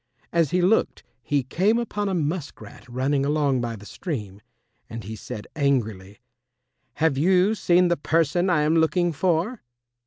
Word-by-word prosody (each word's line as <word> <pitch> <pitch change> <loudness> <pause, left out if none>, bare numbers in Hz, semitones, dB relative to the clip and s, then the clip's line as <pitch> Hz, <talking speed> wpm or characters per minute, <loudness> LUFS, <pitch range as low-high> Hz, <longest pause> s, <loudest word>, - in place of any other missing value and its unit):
As 165 -4 +2
he 180 +3 +1
looked 200 +5 +1 0.2
he 140 +3 0
came 190 - +1
upon 210 -3 -2
a 190 - -1
musk 160 -1 -3
rat 130 - -13
running 135 +3 0
along 140 -3 +1
by 115 -1 -3
the 105 -1 -12
stream, 105 - -6 0.5
and 115 -1 -7
he 110 +3 -7
said 105 0 -8
angrily, 110 -9 -1 0.8
"Have 150 -2 +1
you 185 +5 +3
seen 180 -4 +3
the 175 0 +1
person 165 +4 +1
I 160 -4 +3
am 155 +2 +2
looking 170 +1 +2
for?" 180 - 0
155 Hz, 160 wpm, -24 LUFS, 130-180 Hz, 0.8 s, you